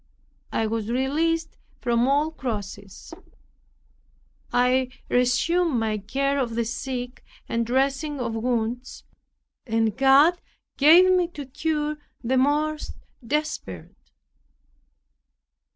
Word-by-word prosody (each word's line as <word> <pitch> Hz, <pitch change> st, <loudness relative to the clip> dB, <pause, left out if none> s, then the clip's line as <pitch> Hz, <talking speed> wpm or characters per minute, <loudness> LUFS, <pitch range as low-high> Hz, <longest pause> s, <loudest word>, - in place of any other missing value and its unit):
I 225 Hz, -, 0 dB
was 220 Hz, 0 st, -2 dB
released 320 Hz, +6 st, 0 dB, 0.2 s
from 235 Hz, +1 st, +1 dB
all 290 Hz, +3 st, +2 dB
crosses. 205 Hz, -8 st, -6 dB, 1.4 s
I 250 Hz, +1 st, +2 dB, 0.2 s
resumed 265 Hz, +5 st, +2 dB
my 215 Hz, -1 st, -1 dB
care 275 Hz, +7 st, -1 dB
of 235 Hz, -4 st, -2 dB
the 235 Hz, 0 st, 0 dB
sick, 250 Hz, +1 st, -5 dB, 0.2 s
and 230 Hz, 0 st, -1 dB
dressing 275 Hz, +3 st, 0 dB
of 235 Hz, -2 st, -2 dB
wounds, 240 Hz, +2 st, -2 dB, 0.6 s
and 225 Hz, -2 st, +1 dB
God 275 Hz, +7 st, +5 dB, 0.3 s
gave 340 Hz, +6 st, +7 dB
me 365 Hz, -2 st, +3 dB
to 285 Hz, -, -5 dB
cure 300 Hz, +2 st, -2 dB, 0.3 s
the 260 Hz, +3 st, +1 dB
most 300 Hz, +3 st, 0 dB, 0.3 s
desperate. 300 Hz, +5 st, -4 dB
260 Hz, 100 wpm, -24 LUFS, 235-300 Hz, 1.4 s, gave